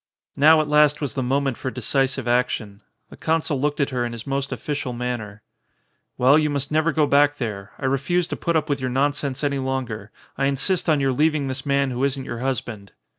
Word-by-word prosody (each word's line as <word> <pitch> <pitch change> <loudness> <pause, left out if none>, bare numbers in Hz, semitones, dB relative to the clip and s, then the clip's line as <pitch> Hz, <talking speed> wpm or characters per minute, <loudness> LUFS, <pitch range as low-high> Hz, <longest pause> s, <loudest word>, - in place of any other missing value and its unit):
Now 155 +2 +6
at 155 - -3
last 150 0 +4
was 140 -6 -3
the 130 - -2
moment 135 0 0
for 130 - -3
decisive 130 +1 -1
action. 120 -4 0 0.3
The - - -12
consul 160 -4 0
looked 145 +1 0
at 140 -1 +1
her 125 -1 -1
in 120 -1 -3
his 115 -1 -8
most 140 0 -2
official 145 -4 -3
man 125 0 -2
ner. 105 -1 -10 0.7
"Well, 135 +5 +5
you 150 -1 +1
must 140 0 -2
never 155 +2 +2
go 155 -1 +2
back 145 0 +3
there. 105 -5 -5
I 135 - -5
refuse 140 +7 +1
to - - -2
put 170 -1 -1
up 155 -1 +1
with 140 -3 -1
your 130 - -1
nonsense 140 +1 -1
any 140 -1 0
longer. 125 -6 -3 0.3
I 135 - +2
in 140 0 +1
sist 180 +5 -1
on 150 -3 +3
your 135 -1 +2
leaving 150 +1 +2
this 130 +1 -4
man 140 -1 +2
who 125 +2 -2
isn't 135 -1 -1
your 120 - -5
hus 130 0 -1
band." 105 -4 -10
135 Hz, 225 wpm, -23 LUFS, 125-145 Hz, 0.7 s, Now